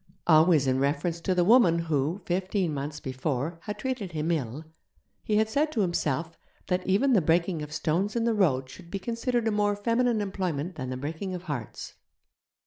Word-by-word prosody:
Always 155 -2 +5
in 130 0 +1
reference 145 +5 0
to 185 +2 0
the 180 - +3
woman 200 -6 +6
who, 165 +2 -1
fifteen 185 -1 -1
months 145 +2 -4
before, 135 +4 -3
had 210 -1 -4
treated 245 -9 -4
him 155 +2 -1
ill; 145 -1 -3 0.6
he 215 - -1
had 215 +1 +3
said 295 +7 0
to 220 - +1
himself 165 -3 -1 0.3
that 180 0 0
even 250 +8 +3
the 205 - +5
breaking 170 +1 +1
of 150 0 -7
stones 170 +7 -1
in 235 - +1
the 230 0 +2
road 145 -11 +2
should 170 +6 -13
be 200 - -3
considered 235 +3 -1
a - - +2
more 205 -1 +1
feminine 230 +2 +1
employment 185 -5 -2
than 130 -5 -5
the 130 - -3
breaking 160 +7 -4
of 180 - -7
hearts. 140 -10 -6
175 Hz, 190 wpm, -27 LUFS, 150-205 Hz, 0.6 s, woman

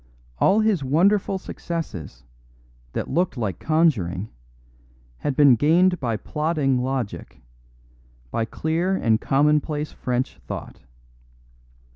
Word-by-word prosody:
All 210 +3 +4
his 210 -8 +1
wonderful 190 +8 +2
successes, 165 - -6 0.7
that - - -3
looked 175 -4 0
like 100 -7 -3
conjuring, 110 - +1 0.9
had 145 - -2
been 140 -3 +6
gained 170 +7 +3
by 115 -5 -1
plodding 150 -2 0
logic, 125 - -4 0.9
by 115 - 0
clear 165 +9 -1
and 110 -10 +1
commonplace 150 +2 +1
French 125 +1 -3
thought. - - -7
150 Hz, 100 wpm, -23 LUFS, 120-170 Hz, 0.9 s, been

